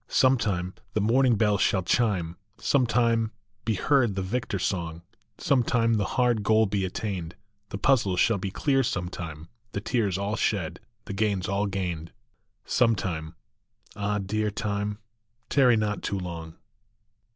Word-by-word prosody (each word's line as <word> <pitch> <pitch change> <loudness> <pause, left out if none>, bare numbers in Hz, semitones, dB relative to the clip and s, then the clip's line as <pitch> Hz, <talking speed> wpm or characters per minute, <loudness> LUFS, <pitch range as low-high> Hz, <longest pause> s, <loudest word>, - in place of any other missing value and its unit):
Some 130 0 +4
time 90 -4 -1 0.2
the - - +3
morning 120 +3 +4
bells 105 -2 +2
shall 95 -2 +2
chime, 90 -6 +1 0.2
Some 130 -4 +2
time 115 -1 +2 0.3
be 110 -2 +1
heard 120 -2 +2
the 95 - -1
victor 105 +1 -2
song, 85 -3 -2 0.3
Some 135 -3 +2
time 115 -1 +2
the 105 -3 +1
hard 120 -3 +3
goal 110 +1 +4
be 95 -1 -1
attained, 90 -3 -4 0.3
The - - -4
puzzles 100 -6 +2
shall 110 -1 +3
be 95 - -3
clear 135 +7 +1
some 90 -8 -2
time, 80 -3 -7 0.3
The - - -1
tears 105 -5 0
all 100 +2 -1
shed, 90 -7 -1 0.3
the 105 - -5
gains 100 -2 0
all 100 +1 0
gained, 90 -4 -3 0.5
Some 115 -3 +3
time 80 -4 -4 0.6
Ah, 105 0 -1
dear 105 +2 -1
time, 105 -1 -2 0.5
tarry 125 -5 +5
not 105 -1 -1
too 100 - -2
long 85 -3 -6
100 Hz, 155 wpm, -27 LUFS, 90-115 Hz, 0.6 s, tarry